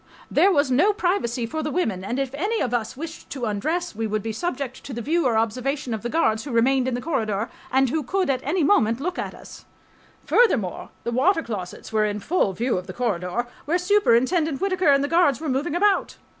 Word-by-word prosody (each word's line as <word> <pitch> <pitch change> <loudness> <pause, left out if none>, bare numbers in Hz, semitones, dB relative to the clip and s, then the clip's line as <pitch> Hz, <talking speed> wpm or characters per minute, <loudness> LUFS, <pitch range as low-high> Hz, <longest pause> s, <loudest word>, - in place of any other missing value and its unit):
There 395 - +5
was 285 -5 +2
no 350 +12 +4
privacy 350 - 0
for 315 +7 -3
the 305 - -2
women, 225 - -1
and 235 +6 -3
if 270 -1 -2
any 405 +10 -1
of 245 - -1
us 235 +1 -2
wished 325 +2 -8
to 260 -4 -4
undress 315 - -2
we 225 +1 -2
would 215 -1 -2
be 225 - -2
subject 265 -1 -4
to 275 - -6
the 235 - -4
view 330 +2 +1
or 230 -3 +2
observation 250 +4 -1
of 220 - -3
the 240 - -3
guards 220 -8 +1
who 290 - -7
remained 255 +3 +3
in 255 - 0
the 245 - -3
corridor 225 -9 -1 0.2
and 265 -1 +3
who 315 - 0
could 370 +8 -1
at 260 -2 0
any 320 +5 0
moment 230 - +3
look 355 +5 -3
at - - -4
us.... - - -13 0.6
Furthermore, 255 - +2
the 235 - -2
water 325 +8 +2
closets 200 -2 -6
were 215 -1 +3
in 210 0 -2
full 290 - +1
view 235 0 0
of 185 - -11
the 185 - -6
corridor 205 -1 -1 0.2
where 325 +5 +2
Superintendent 325 - +2
Whittaker 370 -3 +1
and 275 0 +4
the - - 0
guards 330 -5 +3
were 315 -1 -3
moving 285 +5 -1
about. 395 +2 +2
265 Hz, 225 wpm, -24 LUFS, 230-330 Hz, 0.6 s, There